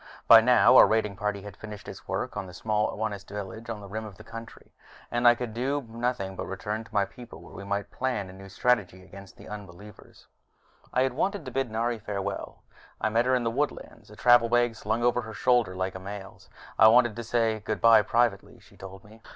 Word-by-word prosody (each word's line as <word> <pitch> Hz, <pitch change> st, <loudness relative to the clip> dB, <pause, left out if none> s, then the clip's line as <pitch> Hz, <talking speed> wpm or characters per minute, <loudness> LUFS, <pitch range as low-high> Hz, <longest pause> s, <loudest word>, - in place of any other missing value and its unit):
By -, -, +10 dB
now -, -, +6 dB
our -, -, +9 dB
raiding 110 Hz, -2 st, 0 dB
party 100 Hz, 0 st, -3 dB
had 105 Hz, -2 st, -9 dB
finished 105 Hz, -2 st, -10 dB
its -, -, -10 dB
work -, -, -3 dB
on 95 Hz, -, -4 dB
the 90 Hz, -, -11 dB
small 105 Hz, +3 st, 0 dB
Onist 105 Hz, -2 st, -4 dB
village 105 Hz, +3 st, -7 dB
on 110 Hz, -2 st, -5 dB
the 100 Hz, -, -10 dB
rim 110 Hz, +3 st, -5 dB
of 105 Hz, -3 st, -9 dB
our -, -, -11 dB
country, 115 Hz, 0 st, -11 dB, 0.4 s
and 120 Hz, 0 st, +2 dB
I 120 Hz, -, +7 dB
could 120 Hz, -2 st, -5 dB
do 135 Hz, +4 st, -2 dB
nothing 115 Hz, -4 st, -3 dB
but -, -, -5 dB
return 105 Hz, +3 st, -4 dB
to 115 Hz, -, -19 dB
my 100 Hz, -2 st, +2 dB
people, 120 Hz, -1 st, -12 dB
where -, -, -14 dB
we 100 Hz, -, -8 dB
might 100 Hz, 0 st, -3 dB
plan 105 Hz, -8 st, -3 dB
new 95 Hz, 0 st, -12 dB
strategy 95 Hz, -3 st, 0 dB
against 100 Hz, +1 st, -13 dB
the -, -, -13 dB
unbelievers. 105 Hz, 0 st, -12 dB, 0.6 s
But -, -, -28 dB
I 130 Hz, -, +2 dB
had 130 Hz, -1 st, -1 dB
wanted 190 Hz, +4 st, -2 dB
to 130 Hz, -, -6 dB
bid 135 Hz, -1 st, -1 dB
Nari 115 Hz, +1 st, -1 dB
farewell. 100 Hz, -2 st, -5 dB, 0.4 s
I 110 Hz, -, 0 dB
met 115 Hz, +3 st, +1 dB
her 130 Hz, -, +3 dB
in 125 Hz, -, 0 dB
the 115 Hz, -, 0 dB
woodlands, 120 Hz, -5 st, -4 dB
a 105 Hz, -, -13 dB
travel 120 Hz, 0 st, +5 dB
bag 120 Hz, -1 st, +2 dB
slung 110 Hz, +2 st, -2 dB
over 120 Hz, 0 st, +2 dB
her 110 Hz, -1 st, -9 dB
shoulder 120 Hz, -7 st, +2 dB
like 95 Hz, 0 st, -2 dB
a 95 Hz, -, -7 dB
male's. 100 Hz, +1 st, -9 dB, 0.3 s
"I 110 Hz, -, +9 dB
wanted 120 Hz, -1 st, +5 dB
to 120 Hz, -, -5 dB
say 115 Hz, -1 st, 0 dB
goodbye 110 Hz, +1 st, +4 dB
privately," 115 Hz, -1 st, 0 dB
she -, -, -21 dB
told 95 Hz, 0 st, -11 dB
me. 110 Hz, +2 st, -17 dB
110 Hz, 225 wpm, -27 LUFS, 100-120 Hz, 0.6 s, By